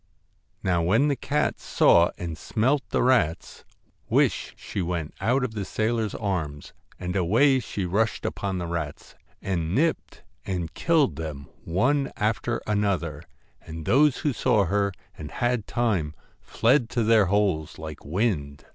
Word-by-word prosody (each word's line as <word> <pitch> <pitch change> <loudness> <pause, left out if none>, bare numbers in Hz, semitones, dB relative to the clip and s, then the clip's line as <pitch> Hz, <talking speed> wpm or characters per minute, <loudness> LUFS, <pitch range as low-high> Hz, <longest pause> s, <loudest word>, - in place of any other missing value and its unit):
Now 90 -2 +2
when 110 - +3
the 140 - +1
cat 150 +3 -1
saw 85 0 +4
and 85 -2 -5
smelt 125 - 0
the - - +1
rats, 105 -10 +1 0.4
whish - - +1
she 100 - -4
went 85 -3 -3
out 125 +6 +2
of 120 -3 -2
the 105 -2 -3
sailor's 110 +1 -1
arms, 80 -8 -3 0.3
and 90 0 -4
away 115 +10 +4
she 100 -5 -4
rushed 105 +5 0
upon 95 -2 -2
the 90 - -3
rats, 85 -1 -5 0.3
and 85 -3 -1
nipped 160 +4 -1 0.2
and 90 -4 -3
killed 160 -5 +2
them 75 -3 -6 0.2
one 135 - +1
after 110 +2 -1
another, 95 -8 -1 0.4
and 80 0 -8
those 145 0 +4
who 145 - +2
saw 115 -5 +2
her, 100 +2 +1 0.3
and 75 - -6
had 120 -3 -1
time, 100 -11 0 0.2
fled 120 0 +2
to 120 - 0
their 110 -3 +4
holes 95 -6 0
like 80 -2 -8
wind. 75 -5 -2
100 Hz, 145 wpm, -25 LUFS, 85-120 Hz, 0.4 s, saw